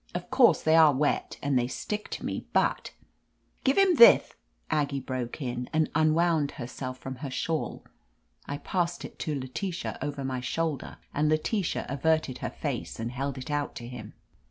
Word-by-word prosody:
Of 180 Hz, 0 st, -5 dB
course, 260 Hz, -2 st, +5 dB
they 160 Hz, 0 st, +4 dB
are 155 Hz, -4 st, +7 dB
wet, 145 Hz, +2 st, 0 dB
and 140 Hz, -3 st, +2 dB
they 120 Hz, -, 0 dB
stick 210 Hz, +10 st, -4 dB
to -, -, -5 dB
me, -, -, -4 dB
but -, -, +1 dB, 0.2 s
— -, -, -45 dB
" -, -, -40 dB
"Give 270 Hz, +1 st, +2 dB
him 390 Hz, -3 st, +5 dB
thith," 475 Hz, -, +8 dB, 0.4 s
Aggie 145 Hz, -3 st, +1 dB
broke 130 Hz, +1 st, -4 dB
in, 125 Hz, -1 st, -4 dB
and 155 Hz, 0 st, +1 dB
un 155 Hz, 0 st, +3 dB
wound 165 Hz, -4 st, +2 dB
herself 130 Hz, -1 st, -6 dB
from 130 Hz, 0 st, -7 dB
her 140 Hz, +1 st, -5 dB
shawl. 155 Hz, +4 st, -2 dB, 0.6 s
I 145 Hz, -, -3 dB
passed 175 Hz, +1 st, -2 dB
it -, -, -11 dB
to 150 Hz, -3 st, -2 dB
Letitia 170 Hz, +8 st, -4 dB
over 145 Hz, 0 st, -3 dB
my 130 Hz, -1 st, -2 dB
shoulder, 155 Hz, +3 st, -2 dB, 0.2 s
and 150 Hz, +1 st, +2 dB
Letitia 165 Hz, +5 st, 0 dB
averted 140 Hz, -1 st, 0 dB
her -, -, -3 dB
face -, -, -4 dB
and 115 Hz, +1 st, -3 dB
held 135 Hz, +2 st, -3 dB
it 130 Hz, +3 st, -6 dB
out 145 Hz, -1 st, -1 dB
to 120 Hz, -, -7 dB
him. 120 Hz, -4 st, -8 dB
145 Hz, 185 wpm, -28 LUFS, 130-165 Hz, 0.6 s, thith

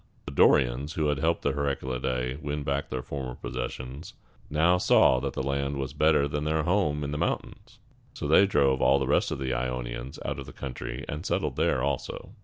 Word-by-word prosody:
The -, -, -6 dB
Dorians, 70 Hz, +2 st, +3 dB
who 75 Hz, -2 st, 0 dB
had 75 Hz, -2 st, 0 dB
helped 80 Hz, +2 st, +1 dB
the 70 Hz, -, +2 dB
Heraclidæ 65 Hz, -1 st, -2 dB
win 75 Hz, 0 st, -3 dB
back 70 Hz, 0 st, -2 dB
their 65 Hz, -1 st, -3 dB
former 65 Hz, -2 st, -5 dB
possessions, 65 Hz, +5 st, -6 dB, 0.3 s
now 80 Hz, +4 st, +3 dB
saw 65 Hz, -, +5 dB
that 70 Hz, +1 st, -3 dB
the -, -, -2 dB
land 70 Hz, +1 st, -1 dB
here -, -, -4 dB
was 65 Hz, 0 st, -3 dB
better 75 Hz, -1 st, +3 dB
than 75 Hz, +1 st, -3 dB
their 80 Hz, 0 st, 0 dB
home 85 Hz, -4 st, +1 dB
in 70 Hz, -, -3 dB
the 75 Hz, -, -3 dB
mountains, -, -, -3 dB, 0.4 s
so -, -, -4 dB
they 90 Hz, +6 st, +6 dB
drove 70 Hz, -7 st, +2 dB
all 70 Hz, -, +5 dB
the 70 Hz, -, 0 dB
rest -, -, +2 dB
of -, -, -3 dB
the 65 Hz, -2 st, -2 dB
Ionians -, -, -4 dB
out 70 Hz, -1 st, -3 dB
of 70 Hz, -, -8 dB
the 65 Hz, -, -10 dB
country, 60 Hz, -2 st, -6 dB
and 75 Hz, +3 st, -5 dB
settled -, -, -1 dB
there 65 Hz, -, +1 dB
also. 70 Hz, -2 st, -3 dB
70 Hz, 205 wpm, -27 LUFS, 65-75 Hz, 0.4 s, they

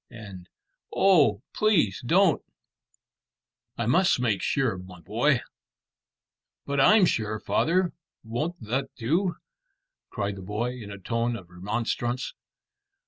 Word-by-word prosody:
and 100 Hz, -7 st, -11 dB, 0.4 s
"Oh, 145 Hz, -, +4 dB
please 180 Hz, -, +2 dB
don't!" 170 Hz, +5 st, +3 dB, 1.4 s
"I 120 Hz, -, -1 dB
must 175 Hz, +7 st, +3 dB
make 115 Hz, -6 st, 0 dB
sure, 130 Hz, -7 st, +1 dB
my 90 Hz, -1 st, -11 dB
boy." 85 Hz, -, +1 dB, 1.2 s
"But 140 Hz, 0 st, -1 dB
I'm 205 Hz, +5 st, +6 dB
sure, 110 Hz, -7 st, -1 dB
father; 180 Hz, -, +1 dB, 0.3 s
won't 150 Hz, +11 st, -3 dB
that 120 Hz, +5 st, -2 dB
do?" 170 Hz, -, 0 dB, 0.7 s
cried 100 Hz, 0 st, -3 dB
the -, -, -8 dB
boy, 105 Hz, +6 st, -2 dB
in 120 Hz, -5 st, -9 dB
a 100 Hz, -, -7 dB
tone 115 Hz, +4 st, -1 dB
of 90 Hz, -6 st, -10 dB
remonstrance. 120 Hz, +7 st, -2 dB
120 Hz, 115 wpm, -26 LUFS, 100-160 Hz, 1.4 s, I'm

